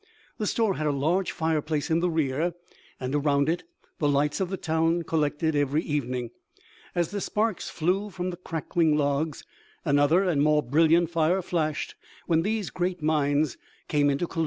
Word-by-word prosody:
The 210 - -1
store 220 -4 +1
had 155 - -1
a - - +2
large 160 +7 +1
fire 160 -1 0
place 155 +1 -2
in 160 - +3
the 180 +1 +1
rear, 160 +1 0 0.4
and 130 +1 -3
around 140 -1 +2
it 165 +2 -1 0.3
the 150 - +2
lights 145 +1 +1
of 190 -2 -1
the 190 - -3
town 165 +1 +1
collected 155 0 0
every 145 +2 +1
evening. 125 -5 -2 0.6
As 175 -1 0
the 205 -1 -3
sparks 215 -1 -1
flew 185 +6 0
from 185 -1 -3
the 175 - -7
crackling 165 -2 0
logs, 145 +1 0 0.4
another 145 +5 +4
and 170 -7 +1
more 150 0 +3
brilliant 165 +5 +3
fire 170 +3 +2
flashed 155 -4 -1 0.3
when 165 -2 +2
these 210 +1 -2
great 180 -2 -2
minds 150 -2 +1 0.3
came 145 -1 +3
into 140 +5 0
collision. 165 - -6
160 Hz, 175 wpm, -26 LUFS, 145-175 Hz, 0.6 s, another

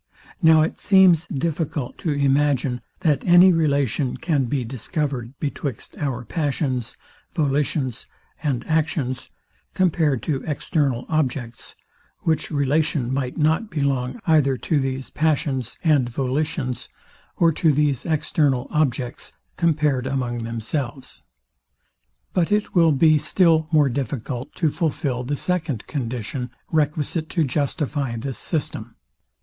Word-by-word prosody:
Now 160 -2 +6
it 160 - -3
seems 185 -4 +5
difficult 150 -3 -3
to 170 - -2
imagine, 140 -3 +1 0.2
that 150 -4 +2
any 180 +1 +7
relation 140 -5 +1
can 150 -6 0
be 130 +1 -1
discovered 130 - -3
betwixt 140 -4 -4
our 130 -5 -2
passions, 130 -3 -2 0.4
volitions 140 -4 0 0.3
and 140 -6 -1
actions, 155 - -1 0.5
compared 160 -8 +2
to 140 -5 -2
external 140 -4 0
objects, 130 -6 -2 0.5
which 160 -1 0
relation 145 -3 +1
might 130 -2 -2
not 160 +7 +1
belong 140 - -1
either 145 -5 +3
to 150 +4 0
these 135 -1 -3
passions 145 -5 0
and 145 -7 +3
volitions, 130 +1 -2 0.5
or 165 -1 +4
to 160 0 +2
these 145 -3 +1
external 145 -4 +1
objects, 135 -4 -1 0.2
compared 150 -6 +1
among 125 -3 -2
themselves. 120 +3 -4 1.1
But 180 +1 +1
it 210 0 +1
will 165 -3 +5
be 155 +2 +4
still 160 -2 +3
more 150 -3 +5
difficult 130 -1 -4
to 160 -4 +1
fulfil 140 -6 -1
the 145 +4 -2
second 160 - -2
condition, 125 -2 -4 0.2
requisite 155 +1 0
to 165 - +1
justify 140 -2 -1
this 130 +3 -4
system. 120 -8 -3
145 Hz, 120 wpm, -23 LUFS, 130-160 Hz, 1.1 s, any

